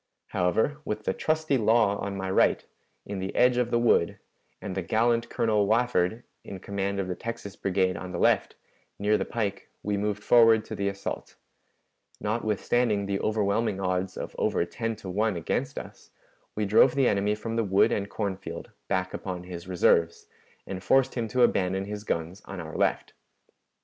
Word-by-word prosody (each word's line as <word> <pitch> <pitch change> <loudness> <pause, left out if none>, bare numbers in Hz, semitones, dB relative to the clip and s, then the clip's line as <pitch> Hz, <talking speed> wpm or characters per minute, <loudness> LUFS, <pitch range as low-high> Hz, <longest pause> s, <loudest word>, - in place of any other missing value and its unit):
However, 110 - +1
with 105 -4 -4
the 95 - 0
trusty 155 -1 0
Law 110 -2 +3
on 100 -1 -4
my 95 -1 -3
right, - - +3 0.4
in 100 -1 -5
the 95 +1 -4
edge 125 0 +4
of 125 -1 +1
the 120 - +2
wood, 120 -8 +3 0.4
and 95 - -5
the 95 - -2
gallant 115 +5 +1
Colonel 105 -3 +1
Wafford 115 -1 +1 0.2
in 95 - -7
command 100 0 -3
of 95 - -2
the 90 - -2
Texas 115 0 -6
Brigade 95 -1 0
on 90 +1 -6
the 90 - -4
left, - - +2 0.4
near 105 +1 +2
the 100 - 0
pike, 105 -4 -3
we 105 0 -1
moved 105 0 -2
forward 115 -2 +5
to - - -6
the 100 - -1
assault. 100 0 -5 0.8
Notwithstanding 110 0 0
the 100 0 -1
overwhelming 105 -1 0
odds 90 0 -1
of - - -6
over - - +1
ten 115 +5 -3
to 105 -2 -11
one 105 +1 +1
against 85 - -2
us, - - -9 0.5
we 105 - 0
drove 110 +6 +5
the 135 -3 +3
enemy 100 +1 +1
from 115 +2 -5
the 115 - +1
wood 100 -1 +3
and 100 0 -1
corn 100 -3 -2
field 85 -3 -8 0.2
back 95 -1 -1
upon 90 -2 -5
his 90 -1 -8
reserves, 85 -2 +2 0.4
and 95 -1 -6
forced 135 +3 +3
him 115 -3 -2
to 125 +3 +2
abandon 95 -4 +1
his 105 0 -6
guns 85 0 -3
on 95 - -7
our 80 -2 -7
left. - - 0
100 Hz, 180 wpm, -27 LUFS, 95-115 Hz, 0.8 s, forward